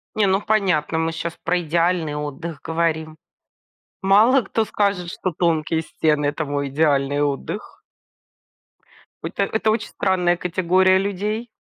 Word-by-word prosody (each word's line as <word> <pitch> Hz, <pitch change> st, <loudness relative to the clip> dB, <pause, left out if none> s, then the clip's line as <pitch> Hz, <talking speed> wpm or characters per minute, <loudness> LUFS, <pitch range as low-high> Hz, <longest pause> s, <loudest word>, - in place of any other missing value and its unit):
Не, 210 Hz, -2 st, +3 dB
ну, 190 Hz, +2 st, +2 dB
понятно, 180 Hz, -8 st, +1 dB
мы 165 Hz, 0 st, 0 dB
щас 165 Hz, +1 st, -5 dB
про 180 Hz, -, +1 dB
идеальный 170 Hz, -1 st, 0 dB
отдых 150 Hz, +1 st, -5 dB
говорим. 160 Hz, -1 st, -1 dB, 0.9 s
Мало 220 Hz, +7 st, +5 dB
кто 225 Hz, 0 st, -1 dB
скажет, 200 Hz, -4 st, -1 dB
что 185 Hz, +1 st, -3 dB
тонкие 160 Hz, -1 st, 0 dB
стены- 150 Hz, -2 st, 0 dB
это 145 Hz, +2 st, -1 dB
мой 140 Hz, -1 st, -2 dB
идеальный 145 Hz, -1 st, +1 dB
отдых. 145 Hz, +8 st, -4 dB, 1.4 s
Это -, -, -2 dB
это 220 Hz, 0 st, 0 dB
очень 220 Hz, 0 st, -1 dB
странная 180 Hz, -2 st, +1 dB
категория 185 Hz, +2 st, +2 dB
людей. 205 Hz, +4 st, -2 dB
170 Hz, 130 wpm, -21 LUFS, 155-195 Hz, 1.4 s, Мало